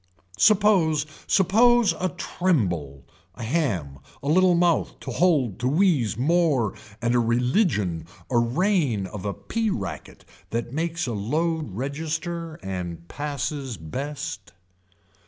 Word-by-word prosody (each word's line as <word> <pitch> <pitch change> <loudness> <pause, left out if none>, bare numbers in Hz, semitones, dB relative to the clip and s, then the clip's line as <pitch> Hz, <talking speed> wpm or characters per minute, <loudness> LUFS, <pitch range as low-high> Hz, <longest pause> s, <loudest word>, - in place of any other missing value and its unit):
Suppose, 195 -8 +4 0.2
suppose 230 +4 +4
a 185 - 0
tremble, 95 - -1 0.3
a 115 - -7
ham, 105 - -1 0.2
a - - -4
little 180 +3 +4
mouth 170 -1 +1
told 145 - +1
to 125 - 0
wheeze 145 - +2
more 145 - +2 0.3
and 120 0 +2
a 125 - +4
religion 115 - +1 0.2
a 120 - +4
reign 130 - +1
of 95 +1 -7
a 100 - -1
pea 230 -1 -2
racket 95 - -5 0.2
that 120 +1 -3
makes 165 +2 -1
a 120 - -3
load 155 - -1
register 160 - -3
and 90 -3 -5
passes 140 -4 -4
best. 95 - -6
140 Hz, 120 wpm, -25 LUFS, 105-170 Hz, 0.3 s, Suppose